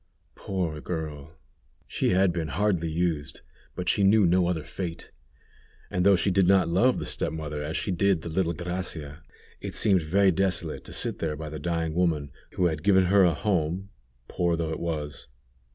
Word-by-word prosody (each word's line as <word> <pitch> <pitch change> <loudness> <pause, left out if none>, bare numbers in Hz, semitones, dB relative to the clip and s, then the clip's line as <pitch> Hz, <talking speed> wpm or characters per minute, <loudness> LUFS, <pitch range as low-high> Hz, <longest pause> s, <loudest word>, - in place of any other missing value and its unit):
Poor 85 -6 -3
girl! 80 -2 -6 0.5
she - - -1
had 95 -1 +3
been 85 -2 -2
hardly 85 +1 0
used, 80 -4 -2 0.3
but 90 -1 -5
she 100 - +2
knew 100 +1 +5
no 90 0 +3
other 85 -4 -1
fate; 85 -1 -6 0.8
and 90 - 0
though 100 +1 +6
she 95 +2 +1
did 95 -1 +3
not 95 -1 +4
love 95 +10 +3
the - - -4
step - - -1
mother 75 -2 -5
as 75 +2 -3
she 100 - -2
did 95 -1 +1
the - - -6
little 85 0 0
Gracia, 85 -3 -5 0.4
it - - -6
seemed 95 -4 +4
very 95 +5 +3
desolate 95 +2 -1
to - - -9
sit - - -2
there 80 -2 -2
by 80 +1 -6
the 75 0 -6
dying 80 0 -2
woman 80 -5 0 0.2
who 90 - +1
had 80 -3 0
given 95 +1 +4
her 100 +2 +5
a 85 -3 +3
home, 90 +1 -1 0.4
poor 85 -1 0
though 80 -1 -2
it 80 - -4
was. 75 -6 -4
85 Hz, 185 wpm, -26 LUFS, 80-95 Hz, 0.8 s, though